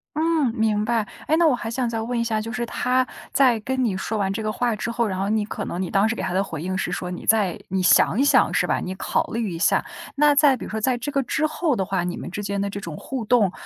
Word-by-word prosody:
嗯， 315 -5 +1
明 215 -1 +1
白。 225 -1 0 0.2
诶， 315 - +3
那 340 - +4
我 280 - +3
还 230 -2 -5
想 245 +1 -1
再 225 -1 -2
问 235 +2 -2
一 - - +1
下， 220 -2 -1
就 225 +1 -6
是 240 0 -2
他 255 +2 0 0.2
在 250 -4 +4
跟 260 +4 -1
你 205 -5 0
说 210 +3 -3
完 195 -2 0
这 220 - -3
个 215 0 -1
话 240 +1 0
之 215 - -4
后， 235 0 0
然 190 -2 -3
后 195 +1 -1
你 215 -1 +1
可 - - -5
能 175 - -4
你 180 - -3
当 200 +3 +3
时 225 - -1
给 - - -4
他 - - -2
的 190 +2 +2
回 160 -5 -6
应 185 +1 -2
是 - - -2
说 180 0 -4
你 180 - -7
再 205 -5 +2
你 190 0 0
想 185 +4 +4
一 275 - +4
想 285 - +4
是 - - +2
吧？ - - 0
你 185 - -5
考 190 - 0
虑 225 -4 -2
一 165 - -5
下。 - - +2 0.3
那 295 0 +5
在 285 -2 +5
比 - - -7
如 - - -8
说 220 0 -3
在 255 +2 +1
这 290 +5 -4
个 275 - +1
之 310 +5 0
后 310 -1 0
的 190 -4 -1
话， 190 -2 -1
你 175 0 -3
们 - - -6
之 205 - -4
间 200 0 -2
的 200 0 -1
这 200 0 -5
种 165 -4 -7
互 260 -4 -5
动， 215 -4 +3
220 Hz, 325 characters per minute, -23 LUFS, 195-250 Hz, 0.3 s, 那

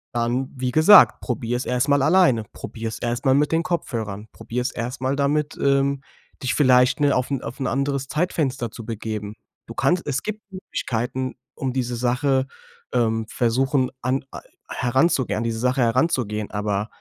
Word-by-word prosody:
Dann, 120 +3 0
wie 130 -1 -2
gesagt, 160 +9 +7
probier's 125 +1 -3
erstmal 135 +3 +2
alleine, 155 -8 +4
probier's 110 -1 -6
erstmal 120 +3 +1
mit 145 +1 +2
den 165 +1 +2
Kopfhörern, 110 - -3
probier's 125 +2 -3
erstmal 130 +3 -3
damit, 145 +1 0
ähm, 140 0 +2 0.4
dich 130 0 -1
vielleicht, 125 -1 +4
ne, 145 -1 +4
auf 130 -1 0
'n 135 - -1
auf 120 - -7
'n 135 - -1
anderes 140 0 -1
Zeitfenster 140 -7 -1
zu 115 - -9
begeben. 110 -2 -5 0.3
Du - - -9
kannst 180 -2 +1
es 140 -2 -1
gibt 215 0 -4
Möglichkeiten, 130 -7 -3 0.2
um 130 -2 -3
diese 125 -2 -2
Sache, 130 +2 +1 0.5
ähm, 115 -2 +1
versuchen 130 +3 +1
an 130 +3 0
a - - -7 0.3
heranzugehen 130 -3 +1
an - - -2
diese 115 -1 -2
Sache 125 +2 +1
heranzugehen, 115 -4 +1
aber, 105 0 -2
130 Hz, 155 wpm, -23 LUFS, 115-140 Hz, 0.5 s, gesagt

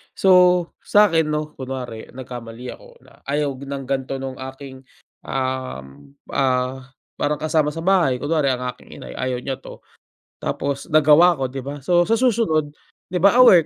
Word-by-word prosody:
So 180 -2 +5
sakin 175 -7 +4
no 150 0 -2
kunwari 130 -4 -6
nagkamali 125 -1 -8
ako - - -14
na - - -21
ayaw 145 0 0
ng 140 0 -6
ganito 135 0 -2
nung 135 -1 -5
aking, 130 0 -9 0.4
um, 70 - -5 0.2
ah, 130 0 0 0.3
parang 150 0 -1
kasama 155 -1 +1
sa 165 +1 -6
bahay 170 -9 +2
kunwari 150 -1 +1
ang 125 0 -4
aking - - -17
inay - - -9
ayaw 130 -1 -2
niya 135 0 -4
to. - - -12 0.6
Tapos 140 -1 -3
nagawa 155 +3 +6
ko - - -1
di 135 -1 -6
ba? 145 +1 -6
So 175 +4 +3
sa 225 - +1
susunod 215 - +2 0.4
di 180 - -1
ba 195 +3 +5
aware 180 -10 +7
140 Hz, 160 wpm, -21 LUFS, 130-165 Hz, 0.6 s, aware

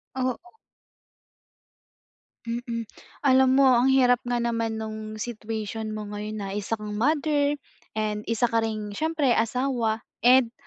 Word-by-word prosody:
Oo. 260 - -3 1.9
Mm. 235 0 -3 0.4
Alam 265 -1 +5
mo 270 -1 +6
ang 245 +1 +4
hirap 250 -2 +5
nga 245 - 0
naman 230 -1 -1
nung 215 0 -5
situation 220 -1 -4
mo 215 - -4
ngayon 210 +1 -5
na - - -4
isa 205 +2 -2
kang 210 -1 -7
mother, 290 +2 +2 0.4
and 210 -1 -2
isa 230 +1 +1
ka 230 - +3
ring 215 -2 -3
siyempre 305 +2 0
asawa, 230 -1 0 0.2
and 245 -1 +5
230 Hz, 130 wpm, -26 LUFS, 215-260 Hz, 1.9 s, mo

